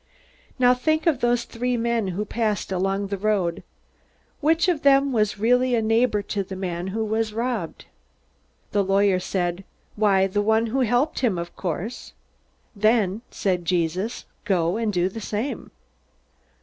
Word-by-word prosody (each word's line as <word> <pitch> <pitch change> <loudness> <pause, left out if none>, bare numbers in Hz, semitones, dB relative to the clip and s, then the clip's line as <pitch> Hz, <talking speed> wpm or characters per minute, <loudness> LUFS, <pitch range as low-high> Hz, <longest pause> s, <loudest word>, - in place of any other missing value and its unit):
"Now, 250 -1 +5
think 310 +5 0
of 315 -7 +2
those 240 -1 +1
three 245 +1 -2
men 230 -2 0
who 190 +3 -3
passed 215 -3 -2
along 195 +2 -1
the 200 -1 -3
road. 195 -5 0 0.8
Which 325 +3 +2
of 340 -5 +1
them 275 -1 +4
was 215 -3 +1
a - - -17
real 245 +4 +4 0.2
neighbor 225 -1 +2
to 200 - -2
the 190 0 -8
man 180 -1 -4
who 220 +3 -2
was 220 0 -1
robbed?" 230 -7 -3 0.9
The 205 -1 +2
lawyer 195 -1 +3
said, 180 0 -2 0.3
"Why, 200 -3 +3
the 200 +2 0
one 220 +2 +2
who 240 +4 -1
helped 245 +4 +1
him, 230 -8 +1
of 170 0 -6
course." 190 +6 -5 0.6
"Then," 215 -1 +2
said 180 -3 -1
Jesus, 180 +5 -1 0.2
"go 175 -2 +1
and 225 -1 0
do 180 -2 +1
the 220 +4 -7
same." 215 +6 -4
210 Hz, 155 wpm, -24 LUFS, 190-240 Hz, 0.9 s, Now